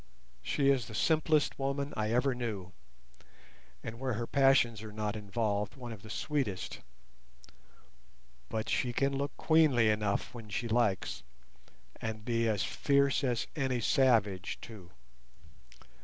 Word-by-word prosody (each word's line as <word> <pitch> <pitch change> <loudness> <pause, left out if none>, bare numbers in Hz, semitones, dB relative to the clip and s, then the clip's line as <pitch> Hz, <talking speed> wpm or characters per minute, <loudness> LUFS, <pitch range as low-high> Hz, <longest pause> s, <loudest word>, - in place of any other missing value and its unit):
She 140 - +2
is 130 -5 0
the 110 - -8
simplest 155 +2 +2
woman 140 +1 -2
I 110 0 -1
ever 125 +3 +2
knew, 110 -7 -4 1.1
and 115 +1 -6
where 130 -1 -1
her 115 +2 -2
passions 135 -5 +3
are 110 -1 -8
not 105 0 -3
involved, 105 +1 -2
one 125 -3 -8
of 110 -3 -9
the 110 - -12
sweetest; 115 -7 -2 1.7
but 110 -1 -3
she 125 -2 0
can 135 +2 +1
look 140 +1 -3
queenly 145 -9 +4
enough 105 -1 -1
when 115 -3 -9
she 115 +3 -2
likes, 115 -4 0 0.8
and 110 -1 -4
be 115 -1 +1
as 105 -4 0
fierce 140 +9 +2
as 120 -4 0
any 130 -4 0
savage 110 -7 +2
too. 100 -6 -11
115 Hz, 135 wpm, -32 LUFS, 105-135 Hz, 1.7 s, queenly